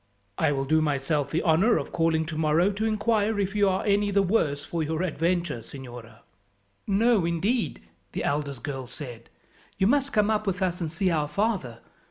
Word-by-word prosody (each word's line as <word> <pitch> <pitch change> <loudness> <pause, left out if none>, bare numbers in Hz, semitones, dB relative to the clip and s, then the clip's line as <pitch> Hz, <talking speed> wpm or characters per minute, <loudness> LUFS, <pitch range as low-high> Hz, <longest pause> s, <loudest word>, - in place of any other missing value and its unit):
"I - - +3
will 135 -1 -1
do 155 +3 +3
myself 145 0 0
the 165 - -1
honour 180 +8 +4
of - - -4
calling 165 -1 +1
tomorrow 160 +3 +2
to 210 +3 -2
inquire 215 -1 +1
if 200 +1 -1
you 205 -1 +4
are 185 - -1
any 205 0 +2
the 200 0 +3
worse 155 -8 +1
for 170 +2 -3
your 160 +2 -1
adventure, 170 -5 -1
signora." 120 -4 -11 0.6
"No, 215 0 +3
indeed," 170 - -1 0.3
the - - -3
eldest 140 -4 -2
girl 135 -3 -5
said. 120 -3 -9 0.5
"You 190 - +2
must 275 +5 +2
come 210 -2 +2
up 215 -1 -1
with 185 -2 -1
us 180 -1 -1
and 160 -2 -2
see 180 +3 0
our 150 -3 0
father. 150 - -2
170 Hz, 185 wpm, -26 LUFS, 145-205 Hz, 0.6 s, honour